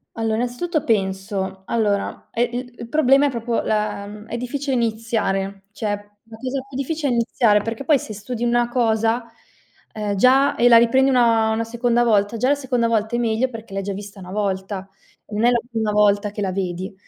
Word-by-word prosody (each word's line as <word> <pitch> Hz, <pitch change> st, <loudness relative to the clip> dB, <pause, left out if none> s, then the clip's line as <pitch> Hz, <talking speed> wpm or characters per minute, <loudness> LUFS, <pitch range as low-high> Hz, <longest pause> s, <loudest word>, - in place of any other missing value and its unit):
Allora, 225 Hz, -1 st, 0 dB
innanzitutto, 250 Hz, +7 st, -1 dB
penso 190 Hz, -2 st, -1 dB
allora, 205 Hz, -3 st, -1 dB
è 235 Hz, -, +1 dB
l 245 Hz, +1 st, -5 dB
il 235 Hz, -, -7 dB
problema 280 Hz, -1 st, +4 dB
è -, -, +2 dB
proprio 235 Hz, -1 st, -1 dB
la 210 Hz, 0 st, -3 dB
è 235 Hz, -, -4 dB
difficile 270 Hz, +2 st, -2 dB
iniziare. 215 Hz, -4 st, -1 dB
Cioè, 215 Hz, 0 st, -4 dB, 0.4 s
la 225 Hz, -1 st, -12 dB
cosa 260 Hz, +3 st, -3 dB
più 265 Hz, -, -7 dB
difficile 290 Hz, +1 st, -1 dB
è -, -, +1 dB
iniziare, 230 Hz, -3 st, +3 dB
perché 230 Hz, +5 st, -4 dB
poi 295 Hz, 0 st, +4 dB
se 215 Hz, -, -7 dB
studi 225 Hz, +4 st, -5 dB
una 240 Hz, 0 st, +2 dB
cosa, 230 Hz, -1 st, +1 dB, 0.7 s
ehm, 210 Hz, -2 st, -2 dB
già 260 Hz, +6 st, +4 dB
e 240 Hz, -, +4 dB
la 230 Hz, -, +9 dB
riprendi 260 Hz, +4 st, +4 dB
una 230 Hz, -3 st, +3 dB
una 220 Hz, +1 st, 0 dB
seconda 235 Hz, +1 st, +1 dB
volta, 210 Hz, -1 st, +2 dB
già 255 Hz, +4 st, +1 dB
la 290 Hz, -, +4 dB
seconda 250 Hz, -4 st, 0 dB
volta 220 Hz, +1 st, 0 dB
è -, -, 0 dB
meglio, 235 Hz, +2 st, +1 dB
perché 225 Hz, -4 st, -10 dB
l'hai 195 Hz, -, -2 dB
già 200 Hz, 0 st, -4 dB
vista 200 Hz, 0 st, -9 dB
una 180 Hz, -, -10 dB
volta. 195 Hz, -1 st, -3 dB, 0.4 s
Non 215 Hz, +2 st, 0 dB
è -, -, +6 dB
la 240 Hz, -1 st, +3 dB
prima 220 Hz, -2 st, -1 dB
volta 205 Hz, 0 st, +3 dB
che 210 Hz, +1 st, -6 dB
la 190 Hz, -2 st, -1 dB
vedi. 185 Hz, 0 st, -3 dB
225 Hz, 195 wpm, -21 LUFS, 205-245 Hz, 0.7 s, la